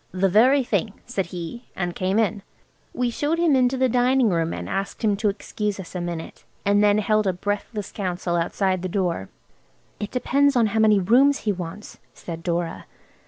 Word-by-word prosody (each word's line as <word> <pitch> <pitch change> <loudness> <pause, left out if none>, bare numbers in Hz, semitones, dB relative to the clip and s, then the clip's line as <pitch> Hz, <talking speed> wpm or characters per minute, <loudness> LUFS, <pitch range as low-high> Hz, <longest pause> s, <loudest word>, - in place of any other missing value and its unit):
"The 190 +1 +2
very 255 +8 +5
thing," 220 -3 -2
said 200 -7 -2
he, 180 +8 -7
and 180 -2 -2
came 190 +3 -1
in. 215 -2 +1 0.5
We 245 -1 -1
showed 295 +7 -1
him 335 -4 +3
into 255 0 +2
the 260 0 +3
dining 250 0 +3
room 165 -2 0
and - - -5
asked 195 +4 -4
him 210 -2 +3
to 210 0 +1
excuse 205 0 -3
us 185 - -9
a 180 - -3
minute, 170 -2 -6 0.2
and 205 +1 +4
then 205 0 +4
held 215 0 +2
a 190 - +2
breathless 205 +2 -4
council 180 -3 -2
outside 185 +2 0
the 185 - -3
door. 175 - -1 0.7
"It 205 - -4
depends 280 +2 +2
how 240 - +4 0.2
many 215 -2 +5
rooms 255 +9 +4
he 215 - 0
wants," 180 +2 -7 0.2
said 165 -1 -7
Dora. 170 0 -3
205 Hz, 185 wpm, -23 LUFS, 180-240 Hz, 0.7 s, very